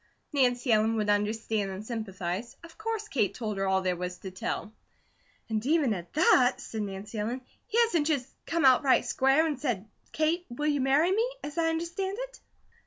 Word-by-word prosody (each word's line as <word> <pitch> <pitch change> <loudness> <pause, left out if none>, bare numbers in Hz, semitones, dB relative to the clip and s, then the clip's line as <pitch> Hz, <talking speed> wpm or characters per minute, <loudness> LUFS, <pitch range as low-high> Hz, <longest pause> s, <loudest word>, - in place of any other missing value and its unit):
Nancy 245 -2 +2
Ellen 220 +1 +3
would 210 -1 +1
understand 210 0 0
and 190 +2 -6
sympathize; 215 -1 -4
of 335 -1 -12
course 435 0 -3
Kate 215 - 0
told 215 -4 -3
her 195 - 0
all 190 0 +2
there 180 -1 +1
was 180 +1 -4
to 190 - -8
tell. 195 +3 -4 0.7
"And 220 -1 -1
even 290 -3 +3
at 175 -3 -7
that," 260 -5 +5
said 220 - -5
Nancy 205 +2 -5
Ellen, 235 +5 -2 0.3
"he 445 - -2
hasn't 340 -11 +2
just 280 -6 0 0.2
come 330 -3 +1
out 260 -1 +7
right 275 -3 +3
square 270 +4 +3
and 300 -5 -2
said 225 -8 -1 0.2
'Kate, 330 +3 0
will 245 +5 -4
you 290 -2 +2
marry 285 +7 +3
me?' 450 +5 +2
as 290 0 -6
I 325 0 +3
understand 340 +5 -2
it." - - -7
245 Hz, 190 wpm, -29 LUFS, 210-315 Hz, 0.7 s, out